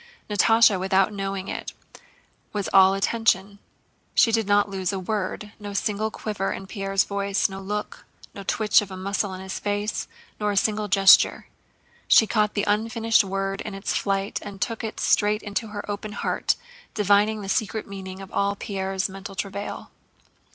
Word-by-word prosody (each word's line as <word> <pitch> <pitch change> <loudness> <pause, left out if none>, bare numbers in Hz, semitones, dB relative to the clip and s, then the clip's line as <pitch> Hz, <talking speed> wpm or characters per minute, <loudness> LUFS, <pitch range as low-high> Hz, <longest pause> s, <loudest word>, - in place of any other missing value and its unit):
Natásha 215 -1 +5
without 190 +2 +2
knowing 195 -1 -4
it - - -5 0.8
was 205 -2 -2
all 190 0 +7
attention: 200 -1 +1 0.6
she 230 - +5
did 225 -2 +1
not 205 0 +4
lose 190 -2 -2
a 195 - -3
word, 205 +1 -3
no 205 -1 -7
single 210 +2 -1
quiver 210 -3 -3
in 195 - -5
Pierre's 195 0 0
voice, 200 0 0
no 195 -1 -8
look, 210 +2 -5 0.3
no 200 - -8
twitch 210 +2 +3
of 205 - -7
a 190 - -7
muscle 200 +1 -2
in 185 - -8
his 190 0 -5
face, 205 +1 -2 0.3
nor 210 -1 0
a 200 - -2
single 215 +1 +1
gesture. 195 -1 +5 0.6
She 220 - +7
caught 210 -1 +1
the 205 - 0
unfinished 225 +2 +2
word 195 0 -3
in 210 - -6
its 195 - -3
flight 195 0 -1
and 200 -1 -9
took 230 +3 -2
it 220 - -5
straight 210 +1 +2
into 210 +2 -3
her 210 -1 -6
open 210 +1 -5
heart, - - 0 0.4
divining 210 +1 +3
the - - -6
secret 215 +2 -1
meaning 190 -1 -8
of 190 - -12
all 200 0 0
Pierre's 195 -1 -2
mental 195 0 -9
travail. 200 +1 -5
200 Hz, 170 wpm, -24 LUFS, 195-210 Hz, 0.8 s, all